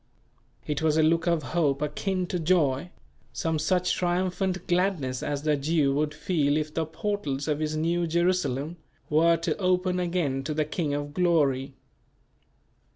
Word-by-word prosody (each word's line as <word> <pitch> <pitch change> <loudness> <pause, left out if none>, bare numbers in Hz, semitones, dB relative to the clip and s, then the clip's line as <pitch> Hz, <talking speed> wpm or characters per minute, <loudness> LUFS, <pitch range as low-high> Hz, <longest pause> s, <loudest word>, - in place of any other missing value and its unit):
It 150 0 -2
was 160 -1 +2
a 160 - +4
look 165 +2 +2
of 170 -3 +2
hope 140 0 0
akin 185 +5 -1
to 180 0 -3
joy, 160 -3 +1 0.4
some 160 -1 -1
such 180 +3 +1
triumphant 185 +1 -1
gladness 175 -8 0
as 145 0 -3
the 155 -1 +2
Jew 145 -1 +1
would 150 +1 0
feel 150 -2 +1
if 155 0 -3
the 160 -1 -1
portals 160 -7 -3
of 150 -1 0
his 155 0 -1
New 170 +2 0
Jerusalem 170 -3 0 0.3
were 165 +2 +4
to 165 - -1
open 180 -1 +1
again 170 -7 -1
to 155 0 -2
the 155 0 +1
King 150 -1 -2
of 145 0 -4
Glory. 145 -6 +1
160 Hz, 155 wpm, -27 LUFS, 145-180 Hz, 0.4 s, a